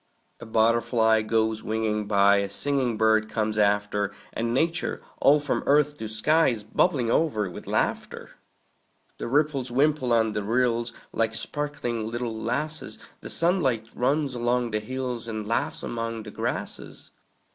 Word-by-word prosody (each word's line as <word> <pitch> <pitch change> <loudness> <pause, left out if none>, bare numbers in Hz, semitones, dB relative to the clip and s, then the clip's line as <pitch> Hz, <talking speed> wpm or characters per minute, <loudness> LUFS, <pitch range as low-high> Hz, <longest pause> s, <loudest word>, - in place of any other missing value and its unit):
A - - -10
butterfly 110 0 +3
goes 110 0 0
winging 110 -1 -1
by; 100 -1 +5
A 100 0 -1
singing 130 +1 0
bird 110 0 +3
comes 110 -1 -1
after; 105 0 +1 0.2
And 115 0 -2
Nature, 165 +7 0 0.2
all 145 +2 +6
from 145 -1 -1
earth 150 +1 +3
to 110 - -4
sky, 150 +10 +2
Is 115 -5 -1
bubbling 125 - +1
o'er 115 -11 +1
with - - -10
laughter. - - -2 0.9
The - - -4
ripples 140 -1 +1
wimple 135 0 +1
on 110 -2 +3
the 105 - -1
rills, 120 +2 0 0.2
Like 115 0 0
sparkling 120 -4 -3
little 120 -1 -3
lasses; 140 +8 -3 0.2
The - - -8
sunlight 135 - +2
runs 140 +2 0
along 120 0 0
the 110 - 0
hills, 125 0 -4
And 110 -2 -4
laughs 115 - -1
among 115 -1 -4
the 105 - -9
grasses. - - -5
115 Hz, 145 wpm, -26 LUFS, 110-135 Hz, 0.9 s, all